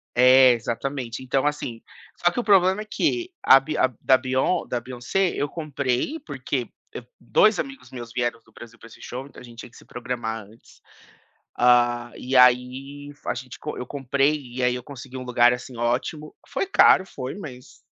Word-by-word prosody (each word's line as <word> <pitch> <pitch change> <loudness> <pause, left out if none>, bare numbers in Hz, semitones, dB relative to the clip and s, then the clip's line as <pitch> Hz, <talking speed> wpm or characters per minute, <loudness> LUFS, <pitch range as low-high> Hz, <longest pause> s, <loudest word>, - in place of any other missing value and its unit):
É, 130 +1 +7
exatamente. 120 +1 -4
Então 135 +2 0
assim 135 -6 -3 0.4
só 175 - +2
que - - -2
o - - -5
problema 190 -1 +4
é - - -9
que, 350 +10 -1
a 135 - +7
bi 155 +2 -5
a 130 - +2
da 130 - +5
Beyon 130 +7 0
da 120 - -3
Beyoncé, 130 +10 -1
eu 145 - -1
comprei, 145 - -2
porque, - - -3 0.3
eh, - - -7 0.2
dois 215 0 +3
amigos 275 -1 -6
meus 120 -2 -8
vieram 120 -2 -2
do 110 - -25
Brasil 115 +1 -13
pra - - -14
esse 115 - -16
show, 130 +2 -7
então 140 - -14
a - - -13
gente 120 -1 -14
tinha - - -11
que - - -20
se - - -16
programar 120 -3 -5
antes, 110 +3 -20 0.8
hã, 120 -1 +3
e 130 +1 -4
aí 130 +3 +3
f 145 - -18
a - - +1
gente 125 +1 -9
co - - -6
eu 125 - -5
comprei 140 +2 +1 0.2
e 130 - -3
aí 125 0 +2
eu 125 - -7
consegui 130 -2 -10
um 130 - -6
lugar, 120 -1 +4
assim, 125 +1 -8
ótimo. 125 +6 -2
Foi - - -2
caro? 190 - +5
Foi, 130 -6 -7
mas 130 -10 -10
130 Hz, 200 wpm, -24 LUFS, 120-145 Hz, 0.8 s, É